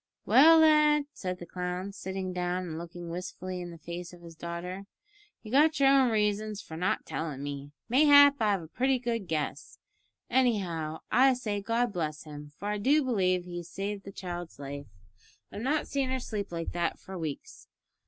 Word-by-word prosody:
"Well, 325 Hz, +4 st, +8 dB
lad," 300 Hz, -2 st, +5 dB
said 185 Hz, -1 st, -4 dB
the 175 Hz, -, -9 dB
clown, 180 Hz, +2 st, -4 dB
sitting 190 Hz, -1 st, -5 dB
down 180 Hz, 0 st, -1 dB
and 160 Hz, -3 st, -5 dB
looking 170 Hz, 0 st, -8 dB
wistfully 180 Hz, +1 st, -5 dB
in 175 Hz, -, -6 dB
the 170 Hz, -, -10 dB
face 175 Hz, +2 st, -7 dB
of 175 Hz, -1 st, -14 dB
his 165 Hz, -1 st, -11 dB
daughter, 175 Hz, +4 st, -6 dB, 0.6 s
"you've 215 Hz, -, -9 dB
got 300 Hz, +3 st, +4 dB
your 275 Hz, -1 st, +6 dB
own 270 Hz, -2 st, +5 dB
reasons 210 Hz, -1 st, 0 dB
for 160 Hz, -, -9 dB
not 180 Hz, +3 st, -1 dB
tellin' 150 Hz, -4 st, -4 dB
me 145 Hz, 0 st, -6 dB, 0.2 s
mayhap 285 Hz, +2 st, +7 dB
I've 205 Hz, -5 st, +1 dB
a -, -, -10 dB
pretty 260 Hz, -, +1 dB
good 230 Hz, -5 st, -3 dB
guess 150 Hz, -2 st, -3 dB, 0.5 s
anyhow 180 Hz, -11 st, 0 dB
I 260 Hz, +1 st, +5 dB
say 210 Hz, -5 st, -3 dB
God 230 Hz, +2 st, 0 dB
bless 155 Hz, -3 st, -3 dB
him, 150 Hz, -1 st, -10 dB
for 205 Hz, -, -4 dB
I 210 Hz, 0 st, -1 dB
do 285 Hz, +8 st, +3 dB
b'lieve 185 Hz, -8 st, +1 dB
he's 175 Hz, -1 st, -7 dB
saved 200 Hz, +2 st, -4 dB
the 195 Hz, -, -8 dB
child's 175 Hz, -3 st, -6 dB
life. 140 Hz, 0 st, -7 dB, 0.6 s
I've 205 Hz, -, -6 dB
not 290 Hz, +5 st, 0 dB
seen 275 Hz, -2 st, -1 dB
her 260 Hz, 0 st, -1 dB
sleep 210 Hz, -6 st, -4 dB
like 165 Hz, -1 st, -4 dB
that 170 Hz, -1 st, -1 dB
for 190 Hz, -, -10 dB
weeks. 160 Hz, -5 st, -6 dB
185 Hz, 185 wpm, -29 LUFS, 170-240 Hz, 0.6 s, Well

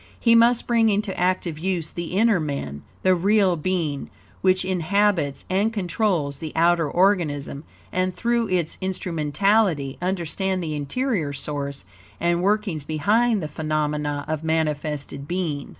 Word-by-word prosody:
He 230 Hz, -, +4 dB
must 235 Hz, +1 st, +5 dB
bring 230 Hz, -2 st, +3 dB
into 205 Hz, -1 st, 0 dB
active 180 Hz, -3 st, 0 dB
use 175 Hz, -2 st, -2 dB
the 170 Hz, +2 st, -4 dB
inner 220 Hz, -3 st, +4 dB
man, 140 Hz, -, -4 dB, 0.2 s
the 185 Hz, -, +5 dB
real 195 Hz, +1 st, +3 dB
being, 160 Hz, -4 st, -2 dB, 0.3 s
which 185 Hz, 0 st, +3 dB
inhabits 185 Hz, -4 st, +1 dB
and 200 Hz, +4 st, +1 dB
controls 180 Hz, -8 st, -1 dB
the 160 Hz, -2 st, -5 dB
outer 165 Hz, -1 st, +3 dB
organism, 165 Hz, -7 st, +1 dB, 0.3 s
and 185 Hz, 0 st, 0 dB
through 235 Hz, +5 st, 0 dB
its 175 Hz, -4 st, -1 dB
instrumentality, 180 Hz, -3 st, 0 dB
understand 185 Hz, +1 st, -1 dB
the 155 Hz, -2 st, -3 dB
interior 155 Hz, -, -1 dB
source 140 Hz, -5 st, -5 dB, 0.3 s
and 170 Hz, 0 st, +1 dB
workings 200 Hz, -5 st, 0 dB
behind 205 Hz, +8 st, +1 dB
the -, -, -2 dB
phenomena 150 Hz, -1 st, -2 dB
of 155 Hz, 0 st, -3 dB
manifested 150 Hz, -3 st, -2 dB
being. 165 Hz, -6 st, -2 dB
175 Hz, 135 wpm, -23 LUFS, 150-195 Hz, 0.3 s, must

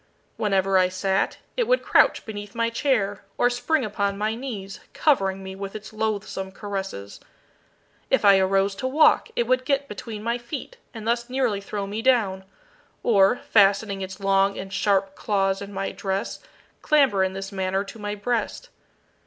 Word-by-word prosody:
Whenever 195 Hz, -2 st, +2 dB
I 185 Hz, 0 st, +3 dB
sat, 190 Hz, +1 st, 0 dB, 0.2 s
it 485 Hz, -2 st, 0 dB
would -, -, +2 dB
crouch -, -, +3 dB
beneath 205 Hz, 0 st, -7 dB
my 230 Hz, 0 st, 0 dB
chair 220 Hz, -7 st, 0 dB
or 245 Hz, -, +3 dB
spring 260 Hz, +3 st, 0 dB
upon 200 Hz, -1 st, -1 dB
my 215 Hz, +2 st, 0 dB
knees, 225 Hz, -6 st, -6 dB
covering 195 Hz, -10 st, +1 dB
me 190 Hz, 0 st, -7 dB
with 195 Hz, +1 st, -7 dB
its 215 Hz, 0 st, -8 dB
loathsome 210 Hz, -3 st, -3 dB
caresses. 195 Hz, -, -6 dB, 0.9 s
If -, -, +2 dB
I 200 Hz, -1 st, +7 dB
arose 195 Hz, +1 st, +2 dB
to 260 Hz, -, -2 dB
walk 300 Hz, +4 st, +4 dB
it 235 Hz, -, +1 dB
would 255 Hz, +1 st, +2 dB
get 280 Hz, +1 st, 0 dB
between 210 Hz, -1 st, -7 dB
my 235 Hz, +2 st, -1 dB
feet 285 Hz, -, -7 dB
and 225 Hz, -3 st, -8 dB
thus 235 Hz, +1 st, 0 dB
nearly 250 Hz, -6 st, 0 dB
throw 200 Hz, 0 st, -4 dB
me 205 Hz, +3 st, -4 dB
down, 215 Hz, -7 st, +2 dB, 0.6 s
or, 200 Hz, 0 st, +4 dB
fastening 200 Hz, -1 st, +4 dB
its 190 Hz, +2 st, -6 dB
long 195 Hz, 0 st, +2 dB
and 195 Hz, +1 st, -7 dB
sharp 195 Hz, -2 st, +1 dB
claws 195 Hz, -2 st, 0 dB
in 200 Hz, 0 st, -7 dB
my 195 Hz, 0 st, -3 dB
dress, 195 Hz, +2 st, -3 dB, 0.4 s
clamber 270 Hz, -11 st, +3 dB
in 190 Hz, 0 st, -1 dB
this 195 Hz, 0 st, -6 dB
manner 190 Hz, 0 st, -1 dB
to 205 Hz, +3 st, -11 dB
my 205 Hz, 0 st, -3 dB
breast. 220 Hz, +1 st, -2 dB
205 Hz, 170 wpm, -24 LUFS, 195-235 Hz, 0.9 s, I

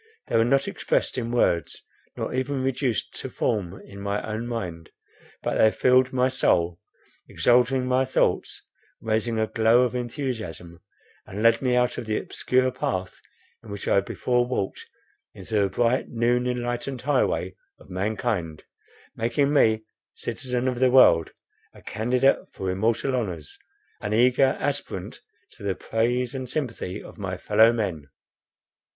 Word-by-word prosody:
They -, -, -1 dB
were 115 Hz, -, +5 dB
not 135 Hz, +3 st, +2 dB
expressed -, -, -1 dB
in 115 Hz, -1 st, -3 dB
words, 85 Hz, -9 st, 0 dB, 0.3 s
nor -, -, -3 dB
even 130 Hz, +1 st, -1 dB
reduced 130 Hz, -4 st, -1 dB
to -, -, -6 dB
form 95 Hz, -4 st, -2 dB
in 100 Hz, 0 st, -11 dB
my 100 Hz, +1 st, -1 dB
own 110 Hz, +2 st, -4 dB
mind; 90 Hz, -9 st, -5 dB, 0.5 s
but -, -, -1 dB
they 110 Hz, -, +7 dB
filled 125 Hz, +3 st, +3 dB
my 130 Hz, 0 st, +2 dB
soul, 85 Hz, -9 st, +1 dB, 0.5 s
exalting 125 Hz, +1 st, +3 dB
my 130 Hz, +1 st, +2 dB
thoughts, 130 Hz, -, 0 dB, 0.3 s
raising 110 Hz, +1 st, -1 dB
a 110 Hz, -, +2 dB
glow 115 Hz, +3 st, +3 dB
of 125 Hz, -, -1 dB
enthusiasm, 115 Hz, -, -5 dB, 0.5 s
and 105 Hz, +3 st, -5 dB
led 115 Hz, 0 st, +5 dB
me 125 Hz, -2 st, +1 dB
out 125 Hz, 0 st, +1 dB
of 115 Hz, -, -7 dB
the 110 Hz, -, 0 dB
obscure 130 Hz, 0 st, 0 dB
path 95 Hz, -7 st, -3 dB, 0.4 s
in 110 Hz, -, -13 dB
which 100 Hz, -1 st, -6 dB
I -, -, +4 dB
before 125 Hz, +4 st, 0 dB
walked, 110 Hz, -6 st, -3 dB, 0.5 s
into 95 Hz, +4 st, -9 dB
the 100 Hz, -1 st, +2 dB
bright 120 Hz, +5 st, +1 dB
noon 120 Hz, +1 st, +1 dB
enlightened 120 Hz, +1 st, -3 dB
highway 125 Hz, -9 st, 0 dB, 0.2 s
of -, -, -16 dB
mankind, 95 Hz, -4 st, -2 dB, 0.5 s
making 140 Hz, +6 st, +1 dB
me, 110 Hz, -6 st, +3 dB, 0.3 s
citizen 125 Hz, 0 st, -3 dB
of 125 Hz, -2 st, -1 dB
the 130 Hz, 0 st, +4 dB
world, 85 Hz, -11 st, +6 dB, 0.5 s
a -, -, -15 dB
candidate 125 Hz, +4 st, +2 dB
for 95 Hz, -1 st, -3 dB
immortal 115 Hz, +7 st, 0 dB
honors, 90 Hz, -, -4 dB, 0.4 s
an 105 Hz, 0 st, -2 dB
eager 125 Hz, +3 st, +4 dB
aspirant 145 Hz, 0 st, -4 dB, 0.3 s
to -, -, -17 dB
the 100 Hz, -2 st, -1 dB
praise 120 Hz, +3 st, -1 dB
and 130 Hz, -2 st, -5 dB
sympathy 115 Hz, -9 st, -4 dB
of -, -, -13 dB
my 95 Hz, -2 st, -4 dB
fellow 110 Hz, +4 st, +5 dB
men. 95 Hz, -11 st, -3 dB
115 Hz, 150 wpm, -25 LUFS, 100-125 Hz, 0.5 s, they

